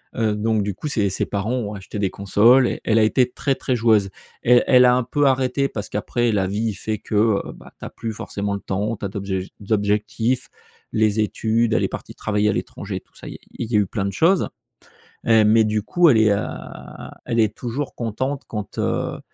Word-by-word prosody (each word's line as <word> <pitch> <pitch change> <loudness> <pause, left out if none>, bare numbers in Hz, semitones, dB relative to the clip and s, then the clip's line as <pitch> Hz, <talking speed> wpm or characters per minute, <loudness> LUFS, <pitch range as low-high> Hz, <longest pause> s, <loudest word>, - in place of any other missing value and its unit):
heu, 110 -3 +1
donc, 110 0 0
du 100 -1 -3
coup, 150 - -6
ses 105 -8 0
ses 95 - -1
parents 105 +4 -2
ont 110 -5 -2
acheté 100 +1 -8
des 100 -2 0
consoles 115 +7 +4
et - - -4
elle 110 0 +3
a - - +5
été 125 +3 +2
très, 135 +2 -1
très 130 - -1
joueuse. 110 -4 +3 0.3
Elle 120 +1 +5
elle 125 -1 +7
a 125 0 +5
un 125 - +1
peu 145 +5 0
arrêté 130 0 +2
parce 105 -5 -6
qu'après 120 +3 -1
la 100 -3 +1
vie 105 +3 -1
fait 110 +2 -3
que, 105 - -5
heu, 105 -1 +3
ben - - -14
tu - - -8
as - - -6
plus 115 -1 -6
forcément 100 -1 -4
le 100 - -3
temps, 100 +4 -2
tu 105 - -6
as - - 0
d'autres 100 0 -6
ject 95 -1 -3 0.2
objectifs, 110 +4 0 0.5
les 110 -1 +2
études, 110 +2 +1
elle - - +2
est - - +2
partie - - -8
travailler 105 0 0
à - - +1
l'étranger, - - -5
tout - - -38
ça, - - -11
il - - -6
y - - -11
a - - -38 0.2
il 120 -1 -4
y - - +1
a - - +5
eu 100 - +1
plein 100 -1 -3
de 100 - -1
choses, 170 - +2 0.8
heu, 110 -1 +6
mais 110 +1 +5
du 105 -1 -1
coup, 175 +8 +4
elle 125 - +5
est, 110 -1 +4
heu, 100 - 0 0.8
elle 115 - -1
est 110 -1 +2
toujours 130 +4 -4
contente 130 +5 -3
quand, 105 -2 -6
heu, - - -1
110 Hz, 235 wpm, -22 LUFS, 105-120 Hz, 0.8 s, elle